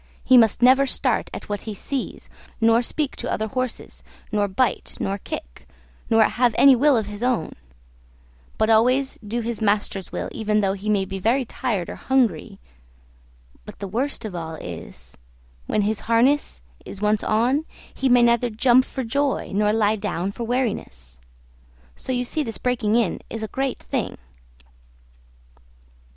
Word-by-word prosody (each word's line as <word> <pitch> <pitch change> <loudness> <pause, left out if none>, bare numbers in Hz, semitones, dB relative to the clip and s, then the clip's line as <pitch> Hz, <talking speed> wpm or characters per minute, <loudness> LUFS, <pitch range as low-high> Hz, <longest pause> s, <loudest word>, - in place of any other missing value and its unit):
He 260 - +5
must 230 -1 +5
never 265 +2 +6
start - - 0
at - - -8
what 205 -1 -3
he 210 - -5
sees, 270 +6 -5 0.3
nor 230 0 +4
speak 285 +3 -2
to - - -4
other 220 - -1
horses, 255 +1 -4 0.3
nor 205 -2 +1
bite, 230 +6 -1
nor 195 +1 -2
kick, - - -8 0.4
nor 225 0 +5
have 240 +1 +2
any 275 -1 +7
will 275 +1 +4
of 220 - 0
his 205 +1 -8
own; 245 -9 0 1.0
but 220 - +2
always 255 +5 +3
do 225 +2 -3
his 230 0 -4
master's 205 -3 0
will, - - -3
even 215 -1 0
though 195 -1 +1
he 200 +2 -5
may 200 -2 +2
be 190 0 -5
very 245 +7 +1
tired 225 -7 -2
or - - -7
hungry; 245 -12 0 1.1
but - - -11
the 200 - -5
worst 245 +6 -2
of 210 - -5
all 160 -2 -5
is, 65 - -9 0.5
when 210 - +1
his 215 +1 0
harness 235 - +1 0.2
is 200 - -9
once 210 0 +1
on, 245 +7 +2 0.3
he 265 - 0
may 245 -1 +6
neither 235 +1 +3
jump 245 +3 +4
for 265 - -5
joy 275 +3 -1
nor 210 +1 +2
lie 215 -1 +2
down 195 -3 -3
for 235 +3 -5
weariness. 65 - -3 0.7
So - - -5
you 250 -1 0
see 305 +6 -1
this 230 -6 -4
breaking 235 -4 0
in 230 -7 +1
is 225 -1 -5
a - - -2
great 270 +3 -2
thing. - - -4
225 Hz, 165 wpm, -23 LUFS, 205-250 Hz, 1.1 s, any